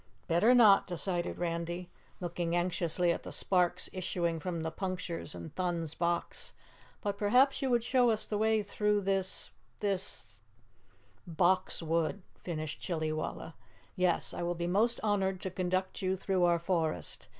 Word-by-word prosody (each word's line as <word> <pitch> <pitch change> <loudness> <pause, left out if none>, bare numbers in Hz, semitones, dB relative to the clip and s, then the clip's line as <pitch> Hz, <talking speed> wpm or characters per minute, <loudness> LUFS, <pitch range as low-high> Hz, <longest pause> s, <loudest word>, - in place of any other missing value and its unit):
"Better 210 +9 +5
not," 215 -5 +7
decided 175 0 -2
Randy, 175 +1 -3 0.3
looking 175 -1 -2
anxiously 175 0 +1
at - - -2
the - - -8
sparks 180 -1 +1
issuing 170 -2 -1
from 170 -1 -3
the 160 - -2
punctures 180 - -4
in 85 -1 -8
Thun's 170 -4 -2
box. 170 0 -2 0.5
"But 200 -1 -2
perhaps 255 +8 +4
you 270 - 0
would 240 -2 +2
show 245 0 +3
us 220 -1 +1
the 210 - -2
way 220 0 +3
through 210 0 +1
this 195 -1 -1 0.3
this 185 - -2 0.4
" 100 - -34 0.2
"Box 185 -1 +2
Wood," 165 +4 0 0.2
finished 155 -4 -4
Chillywalla. 160 -1 -3 0.4
"Yes, 180 -3 +1
I - - -4
will 175 0 -1
be 170 0 -3
most 215 +7 +2
honored 195 -3 +1
to 190 - -3
conduct 185 +1 -1
you 190 0 0
through 185 -1 +1
our 170 -1 +4
forest. 165 - -2
180 Hz, 150 wpm, -32 LUFS, 170-195 Hz, 0.5 s, not